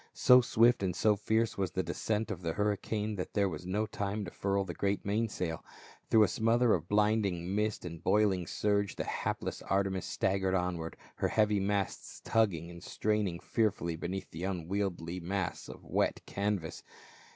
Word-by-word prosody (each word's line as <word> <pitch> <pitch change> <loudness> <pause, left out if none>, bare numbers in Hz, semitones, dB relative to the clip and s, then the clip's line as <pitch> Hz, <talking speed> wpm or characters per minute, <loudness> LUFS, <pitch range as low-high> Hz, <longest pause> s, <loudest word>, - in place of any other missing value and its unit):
So 125 0 +7
swift 120 -1 +4
and 90 -2 -1
so 105 +1 +3
fierce 110 +1 0
was 95 -2 -1
the 95 - 0
descent 105 +6 -2
of 90 -4 -5
the 80 -2 -2
hurri 105 0 0
cane 105 -1 -2
that 90 - -5
there 100 -1 +3
was 90 0 -6
no 105 +4 0
time 100 -1 -3
to 85 - -7
furl 100 0 0
the 85 - -5
great 100 +3 -1
main 110 +3 +1
sail. 85 -5 -3 0.5
Through 110 -1 +6
a - - +4
smother 115 +4 +3
of 85 -1 -1
blinding 105 -4 +1
mist 105 -1 -1
and 85 -1 -7
boiling 95 -4 +2
surge 100 +1 0
the - - -2
hapless - - -3
Arteims 95 -2 +1
staggered 95 0 0
onward, 90 -3 -2 0.2
her - - +1
heavy 105 -2 +2
masts 100 0 -2
tugging 90 -7 +1
and 85 0 -11
straining 105 -4 -1
fearfully 95 -8 0
beneath 90 +4 -5
the 80 +2 -6
unwieldly 90 -1 -2
mass 90 +1 -3
of - - -10
wet - - 0
canvas. 100 -5 -2
100 Hz, 175 wpm, -32 LUFS, 90-105 Hz, 0.5 s, So